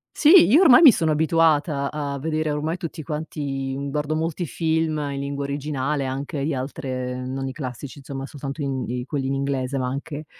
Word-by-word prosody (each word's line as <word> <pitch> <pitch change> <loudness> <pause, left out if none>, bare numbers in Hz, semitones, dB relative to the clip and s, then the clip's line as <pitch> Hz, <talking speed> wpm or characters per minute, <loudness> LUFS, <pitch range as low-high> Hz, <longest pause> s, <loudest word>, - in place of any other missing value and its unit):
Sì! 335 +3 +7
Io 290 - +6
ormai 305 -6 +8
mi 300 -6 +10
sono 160 -7 0
abituata 155 -2 +2
a 145 -2 -3
vedere 155 +2 -2
ormai 150 +3 -2
tutti 165 -3 -6
quanti 145 -3 -4
uhm, 140 0 -4
guardo 150 +1 -1
molti 165 +2 -2
film 160 +1 0
in 140 - -4
lingua 140 0 -3
originale, 140 0 -2
anche 140 +3 -4
agli 145 +3 -1
altre 130 -2 -4
non 135 +1 -4
i - - -3
classici, 130 0 -7
insomma, 135 0 -6
soltanto 140 +1 -6
in 135 -2 -2
i 125 0 -3
quelli 140 -2 -3
in 135 - -1
inglese, 135 -1 -2
ma 130 -1 -1
anche 145 +3 -5
145 Hz, 190 wpm, -23 LUFS, 135-155 Hz, -, mi